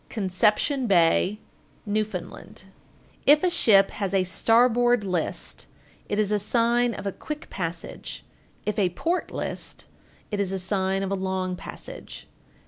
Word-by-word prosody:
Conception 215 +7 +1
Bay, 185 +2 +3 0.5
N.F. 205 -1 -2 0.2
1468. 190 +1 -9 0.6
If 295 +3 +7
a 365 - +3
ship 200 - +5
has 195 -1 -2
a 190 - +4
starboard 240 +4 +3
list, 180 -4 -3 0.4
it 205 - -1
is 210 -1 +1
a 210 - +2
sign 235 +2 +2
of 200 - -7
a 200 - 0
quick 300 +9 -7
passage; 170 -2 -6 0.4
if 210 0 -1
a 190 -3 +3
port 330 - -1
list, - - -5 0.5
it 205 - -2
is 195 -2 0
a 195 - -1
sign 190 +1 0
of 195 - -3
a - - +1
long 190 -1 -2
passage. - - -9
200 Hz, 145 wpm, -25 LUFS, 190-235 Hz, 0.6 s, If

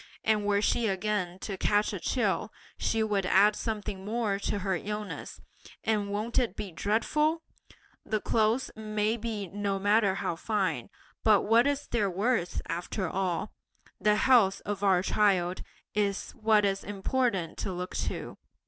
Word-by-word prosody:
And 215 -2 +2
were 205 0 +2
she 235 +1 +2
again 190 -2 -1
to 195 -3 -4
catch 205 0 +2
a - - -3
chill, - - 0 0.2
she 225 0 0
would 205 -2 0
add 200 +3 +5
something 210 -4 -4
more 210 -1 -1
to 200 - -1
her 190 -1 -1
illness; 210 +4 -5 0.4
and 210 -2 0
won't 215 +5 0
it 235 -6 -1
be 200 - -5
dreadful! 300 - +1 0.6
The 215 - -1
clothes 225 +4 +1
may 215 0 -1
be 215 -3 -4
no 200 +1 -2
matter 205 0 +3
how 170 -3 -2
fine, 190 - -1 0.3
but 215 -3 +5
what 230 +4 +4
is 285 0 -1
their 210 -4 0
worth, 195 0 0
after 180 +2 -3
all? 180 -1 -2 0.5
The 210 0 +3
health 215 -4 +4
of 205 -1 -3
our 190 -2 +4
child 185 -4 +2 0.3
is 200 -1 -1
what 215 -2 +3
is 195 0 0
important 200 -3 -1
to 195 - -2
look 180 0 -5
to! - - -4
205 Hz, 155 wpm, -29 LUFS, 195-220 Hz, 0.6 s, add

